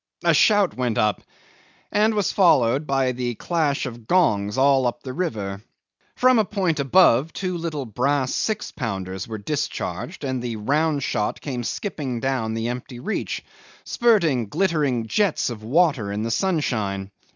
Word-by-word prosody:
A - - +4
shout 205 -4 +4
went 125 -4 -1
up, 105 -1 +1 0.7
and 215 +1 +2
was 205 -2 +1
followed 140 - +3
by 135 -2 +1
a 120 -1 -2
clash 155 0 0
of 120 -3 -8
gongs 105 - +2
all 135 -1 +4
up 120 0 -4
the 130 - -6
river. 105 - -3 0.5
From 255 -2 +4
a - - +4
point 185 -6 -1
above 140 -1 +4
two 185 -2 -3
little 160 -5 -3
brass 130 +4 0
6 215 -1 -2
pounders 95 -5 -4
were 110 -1 -5
discharged, 150 - -4
and 130 -2 -2
the 120 -2 -3
round 145 +6 0
shot 105 - -1
came 125 -4 -4
skipping 135 - -3
down 115 -4 -1
the 115 +1 -2
empty 125 0 -6
reach, 215 - -3 0.4
spurting 170 - +2
glittering 145 - 0
jets 190 - +1
of 110 -3 -7
water 135 - +2
in 105 +1 -2
the 115 - -2
sunshine. 110 - -1
135 Hz, 155 wpm, -23 LUFS, 115-170 Hz, 0.7 s, A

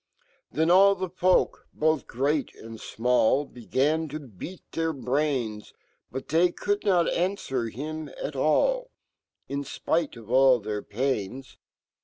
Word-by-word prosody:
" - - -37
Then 160 +2 +2
all 195 +2 +7
fhe 185 -2 -5
folk, 185 0 +2
bofh 155 -3 +1
great 140 +3 -1
and 115 0 -10
final 125 +4 +2
1, - - -22
Began 145 +6 0
to 155 +1 -5
beat 140 - -10
fheir 165 0 -1
brain 125 -5 0
j, - - -17 0.4
Butfhoy 165 +7 +1
could 205 0 -1
not 180 -4 +3
anfwer 135 - -1
him 155 +4 -5
at 145 - -4
all, - - +2 0.6
In 140 +1 -3
fpitc 160 -1 -1
of 115 0 -11
all 130 -1 +6
fhe/ir 105 0 -4
pain*. 125 +1 -2
145 Hz, 145 wpm, -26 LUFS, 125-165 Hz, 0.6 s, all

